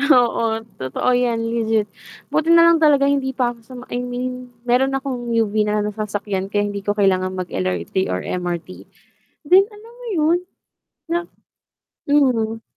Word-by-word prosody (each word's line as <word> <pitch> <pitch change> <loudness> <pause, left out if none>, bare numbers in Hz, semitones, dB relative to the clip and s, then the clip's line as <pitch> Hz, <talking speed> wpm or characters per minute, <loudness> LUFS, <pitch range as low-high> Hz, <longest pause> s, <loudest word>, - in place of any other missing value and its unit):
Oo, 250 -5 +3 0.4
totoo 130 - -1
'yan, 245 -2 +1
legit. 225 -2 +1 0.5
Buti 315 +1 +1
nalang 335 -1 +6
talaga 290 -3 +5
hindi 275 -2 0
pa 245 -2 +1
ako 235 - -17
sa 240 +3 -14 0.2
I 245 - -1
mean, 250 0 -4 0.2
meron 265 +2 +2
akong 255 -3 -4
UV 220 -3 +1 0.2
na 210 0 +1
lang 210 - -2
nasasakyan 205 -2 -3
kaya 205 0 0
hindi 205 -1 -3
ko 205 +1 -2
kailangan 185 -2 +1
mag-LRT 95 - -2
or 90 0 -2
MRT. 175 -1 -3 0.8
Then 375 +5 +6
alam 425 +2 -14
mo - - -10
yun 325 +2 +3 0.7
na 340 +1 +1 0.9
mhm. 240 -6 +2
240 Hz, 150 wpm, -20 LUFS, 205-275 Hz, 0.9 s, nalang